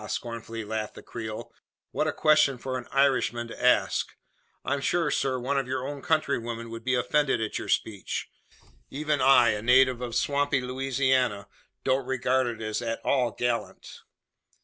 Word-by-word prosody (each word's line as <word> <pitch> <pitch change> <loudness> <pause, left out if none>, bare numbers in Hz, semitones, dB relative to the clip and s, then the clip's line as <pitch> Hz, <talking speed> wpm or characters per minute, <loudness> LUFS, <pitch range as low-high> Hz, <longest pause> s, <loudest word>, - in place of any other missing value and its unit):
scornfully 115 0 -5
laughed 110 0 -4
the - - -11
Creole. 110 -2 -7 0.4
"What - - 0
a - - +1
question 150 -3 +3
for 130 +1 -4
an 125 -1 -5
Irishman 130 -4 +2
to - - -9
ask! 125 - +2 0.5
I'm 140 0 -1
sure, 165 +1 +1
sir, 130 -2 0
one 135 +3 0
of 135 - -4
your 130 0 -2
own 145 -1 -6
countrywomen 120 -7 -1
would 115 0 -7
be 130 +1 +1
offended 145 +3 +1
at 110 -1 -2
your - - -7
speech. 100 -4 -2 0.6
Even 150 0 -1
I, 130 -3 +6
a 105 -1 -1
native 125 +1 +4
of 120 -2 -4
swampy 145 +1 +1
Louisiana, 130 -4 0 0.4
don't 130 -1 +1
regard 130 0 +1
it 115 -2 -5
as 110 +2 -2
at 115 -1 -3
all 125 -3 +2
gallant. 115 -4 -3
125 Hz, 165 wpm, -27 LUFS, 115-135 Hz, 0.6 s, I